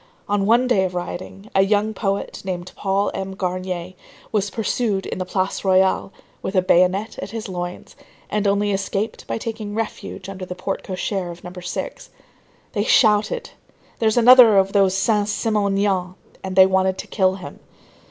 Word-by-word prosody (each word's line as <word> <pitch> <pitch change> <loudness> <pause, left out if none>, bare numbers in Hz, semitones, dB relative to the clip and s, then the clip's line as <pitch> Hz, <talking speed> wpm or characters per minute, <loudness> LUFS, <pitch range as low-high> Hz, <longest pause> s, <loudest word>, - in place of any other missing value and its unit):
On 205 -1 +1
one 235 +3 +4
day 240 -7 +3
of 185 -1 -3
rioting, 185 +3 -6
a 195 - +4
young 210 +2 +2
poet, 200 -2 -3
named 180 -1 -5
Paul 195 +1 0
Aimé 190 0 -5
Garnier, 185 -1 -3 0.4
was 205 -2 0
pursued 215 -2 -1
in - - -5
the 185 - -2
Place 190 +1 -1
Royale, 190 0 +2 0.3
with 190 - -4
a 185 - +4
bayonet 185 +4 +2
at - - -5
his 225 +1 -5
loins, 175 -1 -6 0.3
and 210 -1 0
only 205 +1 +2
escaped 195 +2 -3
by - - -2
taking 220 -2 -5
refuge 220 -3 -5
under 195 -1 -7
the 180 0 -6
porte 190 +2 -3
cochère 185 -1 -3
of 170 0 -12
No. 180 - -7
6. 180 - -6 0.6
They 205 - 0
shouted:—"There's 220 - +1
another 240 -3 +8
of 195 0 +3
those 195 -2 +3
Saint 205 +1 +1
Simonians!" 200 -4 0 0.3
and 190 -1 -4
they 190 0 +8
wanted 190 0 +1
to - - -6
kill 190 -2 +1
him. 170 -7 -10
195 Hz, 165 wpm, -21 LUFS, 185-210 Hz, 0.6 s, another